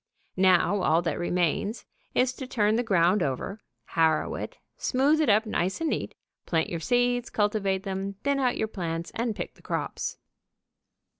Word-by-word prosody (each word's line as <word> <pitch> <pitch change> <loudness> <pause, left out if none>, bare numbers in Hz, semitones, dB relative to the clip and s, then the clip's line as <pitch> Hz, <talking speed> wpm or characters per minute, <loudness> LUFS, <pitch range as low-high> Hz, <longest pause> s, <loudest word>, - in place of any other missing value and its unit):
Now 185 +2 +4
all 165 0 +3
that 170 - -1
remains 175 +5 0 0.3
is 255 0 +3
to 260 0 -7
turn 215 -3 +2
the 235 - +2
ground 190 -3 +3
over, 145 +9 -2 0.3
harrow 160 -2 +2
it, - - -6 0.2
smooth 285 +4 +2
it 300 - +2
up 215 +2 +4
nice 190 -3 -1
and 325 -1 0
neat, - - -3 0.3
plant 160 -2 +1
your 170 - -2
seeds, 245 +6 +1
cultivate 205 -2 0
them, 195 0 -3
thin 280 0 +1
out 250 -2 +1
your 220 - 0
plants 170 -5 -4
and 230 -1 -1
pick - - -5
the - - -22
crops. - - -3
205 Hz, 165 wpm, -27 LUFS, 175-245 Hz, 0.3 s, Now